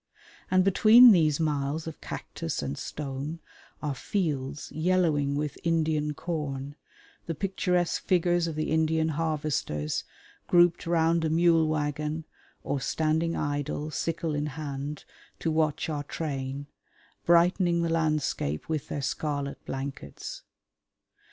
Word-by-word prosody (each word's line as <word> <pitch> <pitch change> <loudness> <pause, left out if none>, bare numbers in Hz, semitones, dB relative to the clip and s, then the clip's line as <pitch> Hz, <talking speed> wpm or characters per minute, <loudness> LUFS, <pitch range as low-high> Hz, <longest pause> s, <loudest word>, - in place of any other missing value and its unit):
And 185 0 +4
between 225 +5 +8
these 155 -6 +4
miles 150 0 -1
of 160 -2 -8
cactus - - -5
and 70 0 -3
stone 145 - -5 0.4
are 150 -2 -1
fields 145 -3 -2
yellowing 155 -4 +1
with 150 0 -3
Indian 155 -3 +1
corn, 145 -4 -4 0.5
the 165 - -2
picturesque 180 -1 0
figures 175 -1 +2
of 160 - -4
the 155 0 -2
Indian 160 0 +2
harvesters, 150 - -1 0.4
grouped 175 -1 +4
round 165 0 +2
a 160 - +1
mule 165 0 +4
waggon 150 +1 -2 0.4
or 140 - -2
standing 160 +4 0
idle, 145 +1 -2
sickle 165 0 -2
in 145 0 -1
hand, 145 0 -5 0.3
to 165 - -1
watch 155 0 +1
our 150 -2 -2
train, 140 -2 -4 0.6
brightening 170 0 +4
the 170 - 0
landscape 155 - 0
with 155 -3 -2
their 145 - -4
scarlet 140 +1 -3
blankets. 135 - -6
155 Hz, 120 wpm, -28 LUFS, 145-165 Hz, 0.6 s, between